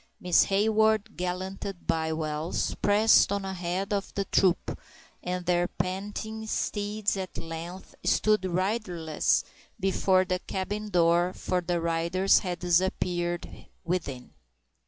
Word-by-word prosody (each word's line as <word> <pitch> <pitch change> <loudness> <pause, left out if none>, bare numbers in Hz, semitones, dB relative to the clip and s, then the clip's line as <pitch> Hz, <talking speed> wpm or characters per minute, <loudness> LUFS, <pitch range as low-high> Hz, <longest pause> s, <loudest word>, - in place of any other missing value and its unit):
Miss 180 -1 +4
Hayward, 220 +1 +2
gallanted 185 +1 -4
by 160 -1 0
Wells, 155 +1 -2
pressed 210 0 +5
on 200 -1 -1
ahead 190 +1 -2
of 200 -1 -2
the 200 - -1
troop, 185 -1 +1 0.4
and 180 0 -3
their 175 0 +2
panting 210 +5 -4
steeds 210 -1 -1
at 190 -1 -5
length 165 +3 -7
stood 215 -2 +3
riderless 185 -3 0 0.4
before 190 -1 +2
the 180 0 -1
cabin 205 +4 -4
door, 175 0 +3
for 180 -1 -1
the 175 0 -1
riders 170 +3 +2
had 180 -2 -3
disappeared 175 0 -1 0.2
within. 165 -8 -3
185 Hz, 115 wpm, -28 LUFS, 175-200 Hz, 0.4 s, pressed